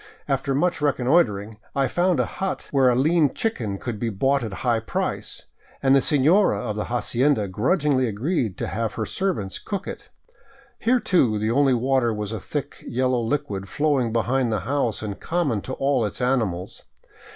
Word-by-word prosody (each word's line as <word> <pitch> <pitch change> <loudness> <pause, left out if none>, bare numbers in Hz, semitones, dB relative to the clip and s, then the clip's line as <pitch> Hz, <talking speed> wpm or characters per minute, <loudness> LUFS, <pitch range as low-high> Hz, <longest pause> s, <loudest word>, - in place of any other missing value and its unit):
After 135 -1 0
much 175 +2 +1
reconnoitering 125 -7 +1 0.2
I 135 -1 +2
found 175 +6 +1
a - - +2
hut 195 -1 -4
where 135 -3 +4
a 125 - +3
lean 150 +2 +3
chicken 115 - -2
could 115 0 -5
be 115 - -1
bought 135 +7 +1
at 110 - -4
a - - -6
high 120 -2 +3
price, 110 - -3 0.4
and 135 0 +5
the 135 - +5
senora 155 +10 +3
of 110 -4 -3
the 105 - -2
hacienda 120 -1 +1
grudgingly 130 - +1
agreed 115 - -1
to - - -2
have 110 +1 -2
her 110 - -2
servants 110 - -2
cook 200 -1 -5
it. - - -8 0.7
Here, 250 +2 +3
too, 130 - +2
the 110 +2 0
only 135 +1 +3
water 130 -1 +2
was 105 -1 -4
a 110 - -3
thick - - -5
yellow 125 0 +1
liquid 115 -6 -2
flowing 145 -6 +1
behind 120 +2 +1
the 105 -3 0
house 120 -1 -1
and 100 -2 -5
common 155 - -1
to 130 - -6
all 135 -3 +1
its 105 -2 -3
animals. 115 -9 -1
125 Hz, 180 wpm, -24 LUFS, 110-145 Hz, 0.7 s, and